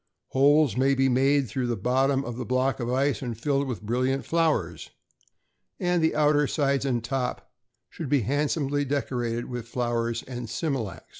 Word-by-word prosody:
Holes 145 Hz, -2 st, +4 dB
may 135 Hz, +1 st, +3 dB
be 135 Hz, 0 st, +2 dB
made 135 Hz, +2 st, +3 dB
through 125 Hz, +4 st, -2 dB
the 120 Hz, -1 st, -1 dB
bottom 135 Hz, +5 st, +1 dB
of 120 Hz, -, -5 dB
the 125 Hz, -, -4 dB
block 130 Hz, +1 st, 0 dB
of 120 Hz, -, -2 dB
ice, 135 Hz, +2 st, +1 dB
and 120 Hz, -4 st, -4 dB
filled 140 Hz, +2 st, 0 dB
with 120 Hz, -5 st, -5 dB
brilliant 130 Hz, +5 st, 0 dB
flowers; 130 Hz, -, 0 dB, 0.9 s
and 175 Hz, -1 st, +1 dB
the 160 Hz, -, +2 dB
outer 150 Hz, -1 st, +3 dB
sides 140 Hz, -2 st, 0 dB
and 120 Hz, -4 st, 0 dB
top 125 Hz, +1 st, -3 dB, 0.4 s
should 155 Hz, +1 st, -7 dB
be 145 Hz, -2 st, +3 dB
handsomely 145 Hz, +3 st, 0 dB
decorated 125 Hz, -4 st, -2 dB
with 120 Hz, -2 st, -6 dB
flowers 120 Hz, -1 st, -1 dB
and 120 Hz, -3 st, -7 dB
smilax. 115 Hz, -, -3 dB
130 Hz, 165 wpm, -26 LUFS, 120-140 Hz, 0.9 s, Holes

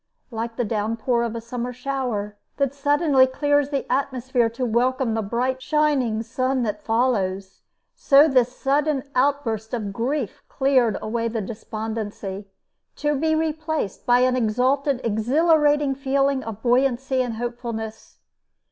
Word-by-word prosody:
Like 230 Hz, 0 st, -4 dB
the 245 Hz, -, -1 dB
downpour 225 Hz, +3 st, 0 dB
of 235 Hz, -1 st, -2 dB
a -, -, -3 dB
summer 245 Hz, +1 st, -4 dB
shower 250 Hz, -5 st, -3 dB, 0.2 s
that 275 Hz, -2 st, 0 dB
suddenly 285 Hz, -1 st, +3 dB
clears 290 Hz, +1 st, +1 dB
the 280 Hz, -2 st, -2 dB
atmosphere 255 Hz, -2 st, 0 dB
to 240 Hz, +3 st, -3 dB
welcome 245 Hz, +1 st, +1 dB
the 225 Hz, -, 0 dB
bright 250 Hz, +5 st, -1 dB
shining 270 Hz, -7 st, +1 dB
sun 255 Hz, +2 st, -1 dB
that 210 Hz, -2 st, -3 dB
follows, 200 Hz, -5 st, -1 dB, 0.3 s
so 285 Hz, +2 st, +5 dB
this 255 Hz, -3 st, +2 dB
sudden 280 Hz, 0 st, +1 dB
outburst 250 Hz, -5 st, 0 dB
of 205 Hz, -4 st, -4 dB
grief 245 Hz, +2 st, -2 dB
cleared 265 Hz, -5 st, +2 dB
away 230 Hz, +1 st, -1 dB
the 230 Hz, 0 st, -2 dB
despondency, 215 Hz, -2 st, -5 dB, 0.5 s
to 295 Hz, 0 st, 0 dB
be 315 Hz, +3 st, +1 dB
replaced 315 Hz, -, -2 dB
by 245 Hz, 0 st, +5 dB
an 255 Hz, 0 st, +3 dB
exalted, 255 Hz, +4 st, +1 dB
exhilarating 290 Hz, +5 st, +2 dB
feeling 275 Hz, 0 st, 0 dB
of 220 Hz, -1 st, -7 dB
buoyancy 260 Hz, +1 st, +2 dB
and 245 Hz, -3 st, -2 dB
hopefulness. 230 Hz, -2 st, -6 dB
250 Hz, 135 wpm, -23 LUFS, 225-275 Hz, 0.5 s, so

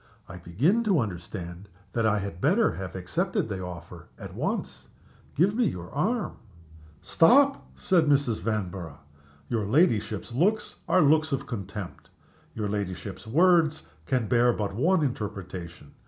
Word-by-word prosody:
I 90 Hz, -, -9 dB
begin 130 Hz, -, +1 dB
to 195 Hz, -7 st, +3 dB
understand 90 Hz, -2 st, -5 dB, 0.2 s
that 115 Hz, -2 st, +1 dB
I 105 Hz, -1 st, +2 dB
had 100 Hz, -3 st, -5 dB
better 200 Hz, +10 st, +3 dB
have 95 Hz, -1 st, -7 dB
accepted 95 Hz, +4 st, -1 dB
the 95 Hz, -2 st, -4 dB
offer 90 Hz, -1 st, -9 dB
at -, -, -9 dB
once. -, -, -4 dB, 0.5 s
Give 185 Hz, +7 st, +3 dB
me 240 Hz, +2 st, +2 dB
your 90 Hz, -, -4 dB
arm." 210 Hz, -, -1 dB, 0.7 s
"Stop!" 270 Hz, +10 st, +4 dB
said 170 Hz, -5 st, +2 dB
Mrs. 140 Hz, -6 st, +2 dB
Vanborough, 90 Hz, -6 st, -4 dB, 0.5 s
"your 115 Hz, -3 st, -1 dB
ladyship's 115 Hz, -, +1 dB
looks 200 Hz, -, 0 dB
are 185 Hz, -, +5 dB
looks 155 Hz, +2 st, +3 dB
of 135 Hz, 0 st, -2 dB
contempt; 100 Hz, -4 st, -7 dB, 0.5 s
your 105 Hz, -2 st, -2 dB
ladyship's 100 Hz, 0 st, -5 dB
words 165 Hz, -, +3 dB, 0.2 s
can 125 Hz, -4 st, 0 dB
bear 120 Hz, +1 st, +4 dB
but 105 Hz, -3 st, -3 dB
one 160 Hz, -, +2 dB
interpretation. 95 Hz, -, -5 dB
110 Hz, 140 wpm, -27 LUFS, 95-160 Hz, 0.7 s, are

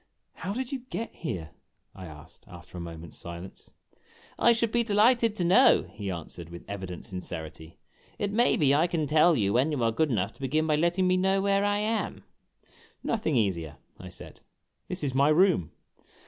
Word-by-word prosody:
"How 185 Hz, -, -5 dB
did 250 Hz, +4 st, -3 dB
you 275 Hz, -, -2 dB
get 230 Hz, -2 st, -4 dB
here?" 90 Hz, -, -5 dB, 0.4 s
I 95 Hz, -1 st, -9 dB
asked, 75 Hz, -1 st, -13 dB
after -, -, -13 dB
a 90 Hz, -, -5 dB
moment's 85 Hz, -1 st, -9 dB
silence. 85 Hz, +2 st, -9 dB, 0.3 s
" -, -, -27 dB
I 235 Hz, -, +6 dB
should 230 Hz, -1 st, +1 dB
be 235 Hz, 0 st, +2 dB
delighted 230 Hz, +1 st, +3 dB
to 180 Hz, -, -1 dB
know," 190 Hz, +10 st, +5 dB
he 100 Hz, -2 st, -5 dB
answered, 85 Hz, -1 st, -7 dB
with 85 Hz, 0 st, -10 dB
evident 95 Hz, -3 st, -6 dB
sin 95 Hz, -4 st, -6 dB
cerity. 80 Hz, -1 st, -7 dB, 0.4 s
"It 205 Hz, -1 st, -2 dB
may 235 Hz, +4 st, +3 dB
be 140 Hz, -3 st, +3 dB
I 155 Hz, +4 st, +3 dB
can 165 Hz, -3 st, -1 dB
tell 155 Hz, +3 st, +4 dB
you, 100 Hz, -5 st, +1 dB
when 130 Hz, +6 st, +2 dB
you 140 Hz, -5 st, -1 dB
are 115 Hz, -, +3 dB
good 155 Hz, +7 st, +1 dB
enough 100 Hz, -6 st, -1 dB
to -, -, -24 dB
begin 155 Hz, +4 st, 0 dB
by 155 Hz, -1 st, +2 dB
letting 170 Hz, +4 st, +1 dB
me 185 Hz, 0 st, +3 dB
know 190 Hz, +1 st, +2 dB
where 200 Hz, 0 st, +2 dB
I 205 Hz, 0 st, +1 dB
am." 215 Hz, +2 st, -2 dB, 0.8 s
"Nothing 205 Hz, -10 st, -1 dB
easier," 85 Hz, -, -1 dB, 0.2 s
I 90 Hz, -, -9 dB
said. 90 Hz, -, -11 dB, 0.5 s
"This 180 Hz, -3 st, -4 dB
is 135 Hz, -3 st, -1 dB
my 140 Hz, +2 st, +4 dB
room." 155 Hz, -, +3 dB
150 Hz, 195 wpm, -28 LUFS, -, 0.8 s, I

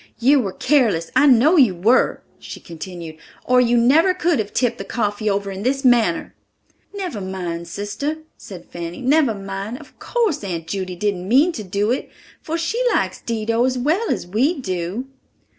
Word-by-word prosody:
"You 275 Hz, +4 st, +4 dB
were 195 Hz, -7 st, -2 dB
careless, 230 Hz, -, +1 dB
I 275 Hz, +3 st, +5 dB
know 275 Hz, +7 st, +5 dB
you 240 Hz, -, +5 dB
were," 215 Hz, +9 st, +2 dB, 0.2 s
she -, -, -9 dB
continued, 170 Hz, -1 st, -9 dB, 0.3 s
"or 250 Hz, 0 st, +4 dB
you 240 Hz, 0 st, +3 dB
never 310 Hz, +10 st, +4 dB
could 340 Hz, -5 st, +1 dB
have 210 Hz, -1 st, -3 dB
tipped 245 Hz, -2 st, 0 dB
the -, -, -4 dB
coffee 210 Hz, -2 st, -2 dB
over 200 Hz, 0 st, -1 dB
in 190 Hz, 0 st, -6 dB
this 270 Hz, +4 st, -1 dB
manner." 230 Hz, -9 st, +2 dB, 0.6 s
"Never 370 Hz, -, -5 dB
mind, 175 Hz, -3 st, -5 dB
sister," 205 Hz, -, -4 dB, 0.2 s
said 180 Hz, -4 st, -11 dB
Fanny, 170 Hz, 0 st, -7 dB
"never 275 Hz, -3 st, +3 dB
mind; 195 Hz, +3 st, -5 dB
of -, -, -16 dB
course, 445 Hz, -, -1 dB
Aunt 170 Hz, -4 st, -4 dB
Judy 185 Hz, +1 st, -4 dB
didn't 190 Hz, -1 st, -2 dB
mean 285 Hz, +9 st, +5 dB
to 220 Hz, -, -6 dB
do 200 Hz, +3 st, -1 dB
it, 255 Hz, -, -2 dB, 0.3 s
for 325 Hz, +1 st, -3 dB
she 375 Hz, +9 st, -1 dB
likes -, -, -1 dB
Dido 230 Hz, 0 st, -1 dB
as 255 Hz, 0 st, +1 dB
well 320 Hz, -, 0 dB
as -, -, -1 dB
we 255 Hz, -, 0 dB
do." 185 Hz, +2 st, -3 dB
225 Hz, 175 wpm, -20 LUFS, 190-275 Hz, 0.6 s, I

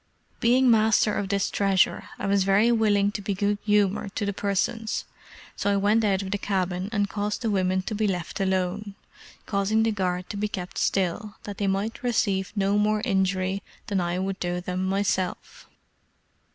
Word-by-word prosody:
Being 250 Hz, +2 st, +4 dB
master 220 Hz, -1 st, +4 dB
of 195 Hz, -, -2 dB
this 200 Hz, -1 st, 0 dB
treasure, 195 Hz, -2 st, +1 dB
I -, -, -4 dB
was 200 Hz, -1 st, +3 dB
very 200 Hz, +5 st, +4 dB
willing 205 Hz, -3 st, +3 dB
to 205 Hz, -, -5 dB
be 195 Hz, 0 st, -2 dB
good 205 Hz, +1 st, 0 dB
humored 205 Hz, -1 st, +1 dB
to 205 Hz, -, -1 dB
the 200 Hz, -, -1 dB
persons; 210 Hz, +3 st, -1 dB, 0.5 s
so 200 Hz, -, 0 dB
I 200 Hz, -, +2 dB
went 210 Hz, +3 st, +3 dB
out 195 Hz, -2 st, +1 dB
of 190 Hz, -, -6 dB
the 205 Hz, -, -1 dB
cabin, 185 Hz, -1 st, -1 dB
and 205 Hz, -3 st, +1 dB
caused 210 Hz, +3 st, -3 dB
the 225 Hz, -, +1 dB
women 185 Hz, -1 st, +1 dB
to 215 Hz, -, -4 dB
be 215 Hz, 0 st, 0 dB
left 180 Hz, -3 st, -3 dB
alone, 190 Hz, +1 st, -1 dB, 0.5 s
causing 205 Hz, +2 st, +1 dB
the 225 Hz, -, +2 dB
guard 185 Hz, -3 st, -2 dB
to 205 Hz, -, -5 dB
be 210 Hz, +1 st, 0 dB
kept 180 Hz, -3 st, -5 dB
still, 195 Hz, +2 st, -1 dB
that 205 Hz, -1 st, -7 dB
they 200 Hz, -, 0 dB
might 200 Hz, +4 st, -1 dB
receive 205 Hz, -6 st, 0 dB
no 200 Hz, 0 st, +2 dB
more 210 Hz, +1 st, +1 dB
injury 190 Hz, -2 st, 0 dB, 0.2 s
than 195 Hz, -3 st, 0 dB
I 175 Hz, 0 st, -1 dB
would 190 Hz, +1 st, -2 dB
do 175 Hz, 0 st, -2 dB
them 180 Hz, +1 st, -3 dB
myself. 190 Hz, -2 st, -2 dB
200 Hz, 185 wpm, -26 LUFS, 190-210 Hz, 0.5 s, Being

